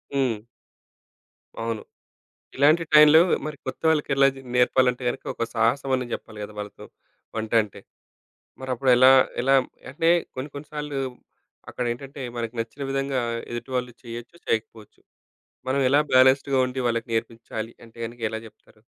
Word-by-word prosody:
హ్మ్. 125 -6 +1 1.2
అవును. 115 -2 -3 0.8
ఇలాంటి 150 +5 +5
టైంలో 150 +1 +9 0.3
మరి 150 -1 -5
కొత్త - - -6
వాళ్ళకేలా 140 -3 +3
జ - - -12 0.2
నేర్పాలంటే, 125 0 +3
గనక - - -4
ఒక 115 - -1
సాహసం 120 +4 +1
అనే 125 -1 -3
చెప్పాలి 105 -1 -9
కదా! 105 - -7
వాళ్ళతో 105 0 -7 0.5
వంట 110 -1 -4
అంటే. 105 - -11 0.8
మరప్పుడేలా 130 0 +4 0.3
ఎలా 135 +2 +3 0.4
అంటే 165 +5 0 0.3
కొన్ని 130 +3 -4
కొన్ని 145 +1 -8
సార్లు 150 -2 -4 0.7
అక్కడ 125 - -3
ఏంటంటే 135 +3 -9 0.2
మనకు 115 0 -4
నచ్చిన 115 +5 -6
విధంగా 135 -1 -1 0.3
ఎదుటివాళ్ళు 125 +1 -3
చేయొచ్చు, 120 +6 -9
చేయకపోచ్చు. 110 -1 -3 0.7
మనం 140 +1 +1
ఎలా 140 +3 +4
బ్యాలెన్స్‌డ్‌గా 130 +1 +5
ఉండి 130 +1 -4
వాళ్ళకి 115 -1 -1
నేర్పించాలి 115 0 -4
అంటే 115 0 -17
గనుక 120 +1 -12
ఎలా 110 - -3
జేప్తారు? 105 0 -20
125 Hz, 135 wpm, -24 LUFS, 115-140 Hz, 1.2 s, టైంలో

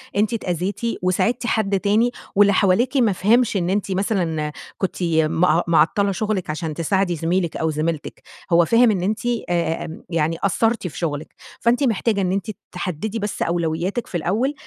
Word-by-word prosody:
أنتِ 210 +2 +1
اتأذيتِ، 180 -2 -2 0.2
وساعدتِ 230 +7 0
حد 200 -3 +1
تاني 215 +5 +2 0.2
واللي 200 0 +5
حواليكِ 230 +9 +2
ما 230 -5 +4
فهمش 215 +3 +2
إن 175 -1 -1
أنتِ 200 0 -1
مثلًا 175 -6 -1 0.3
كنتِ 190 -1 -2
م 160 -1 +1 0.3
معطّلة 170 +5 +3
شغلِك 195 -3 -2
علشان 155 0 -3
تساعدي 175 +3 0
زميلِك 170 +2 -1
أو 160 - 0
زميلتِك، 155 0 -3 0.3
هو 170 0 +5
فاهم 230 +4 +5
إن 190 -4 -1
أنتِ 210 +3 0 0.3
آآ، 170 -2 0 0.3
يعني 165 -1 0
قصّرتِ 220 +1 0
في - - -9
شغلِك، 155 -3 -3 0.3
فأنتِ 245 +4 +2
محتاجة 220 -3 +1
إن 180 -1 0
أنتِ 200 +3 -2 0.2
تحدِّدي 185 +5 -4
بس 205 0 -4
أولوياتِك 170 +6 -1
في 175 - -3
الأول، 215 - 0
190 Hz, 160 wpm, -21 LUFS, 165-215 Hz, 0.3 s, واللي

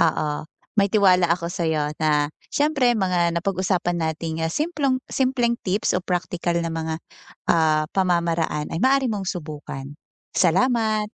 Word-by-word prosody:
oo 155 -1 +2 0.5
may 200 -2 +3
tiwala 185 -5 +4
ako 170 0 +1
sa'yo 160 -4 -1
na 150 -1 +3 0.2
siyempre 285 -4 +2
mga 180 -3 +2
napag-usapan 185 -1 0 0.2
nating 160 0 -4
simplong 290 - 0
simpleng 255 -3 +1
tips 195 +3 0
o 180 - 0
praktikal 175 -1 -1
na 170 - -2
mga, 160 0 -3 0.5
ah, 155 -2 +3
pamamaraan 170 -4 0
ay 165 - -2
maaari 270 0 +4
mong 210 -4 -2
subukan, 145 -4 -7 0.4
salamat. 215 +3 +2
180 Hz, 130 wpm, -23 LUFS, 160-215 Hz, 0.5 s, tiwala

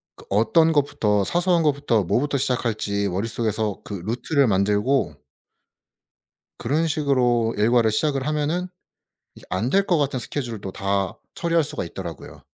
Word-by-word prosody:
그 - - -16
어떤 160 - +3
것부터 105 -8 +1
사소한 175 - +1
것부터 140 -7 +1
뭐부터 140 +10 0
시작할지 110 -5 -1
머릿속에서 110 +1 -1
그 105 - -8
루트를 125 +4 +1
만들고 105 +7 +1 1.4
그런 155 +7 0
식으로 125 -6 +1
일과를 110 +1 +3
시작을 135 +2 0
하면은 155 +4 -1 0.7
이 - - -14
안 110 +7 -1
될 195 +6 +3
것 175 -4 +2
같은 140 -3 0
스케줄도 115 -8 -5
다 100 0 -2 0.2
처리할 170 -1 +1
수가 145 - -4
있더라고요. 85 -2 -8
120 Hz, 315 characters per minute, -23 LUFS, 105-145 Hz, 1.4 s, 어떤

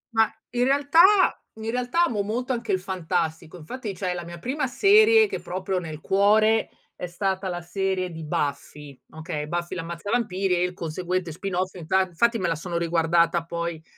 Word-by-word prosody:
Ma 225 0 +4 0.2
in 245 0 +1
realtà 285 +4 +4 0.6
in 220 +1 -5
realtà 250 +7 +1
amo 215 -9 -1
molto 245 +6 -2
anche 230 -3 -3
il 190 - +2
fantastico. 175 -2 -3
Infatti 205 +5 -6
cioè 180 -2 -2
la 175 -1 -5
mia 170 0 -9
prima 265 - -2
serie 430 - +5
che - - -5
è - - -10
proprio 185 +1 -3
nel 155 -3 -7
cuore 215 +4 +3 0.3
è 180 - -5
stata 190 +2 -2
la 175 -1 -3
serie 185 0 -2
di 160 -1 -8
Buffy, 145 -1 -4
okay, 160 -2 -5
Buffy 175 +2 -3
L'Ammazzavampiri, 185 +2 -1
e 175 - +1
il 180 0 -1
conseguente 180 +1 -3
spin 190 +3 -5
off. 185 +1 -1
Inta 180 +2 +1
infatti 230 +7 +1
me 180 - 0
la 165 - 0
sono 170 +2 -4
riguardata 170 0 +2
poi, 170 -1 -4
185 Hz, 180 wpm, -25 LUFS, 170-220 Hz, 0.6 s, serie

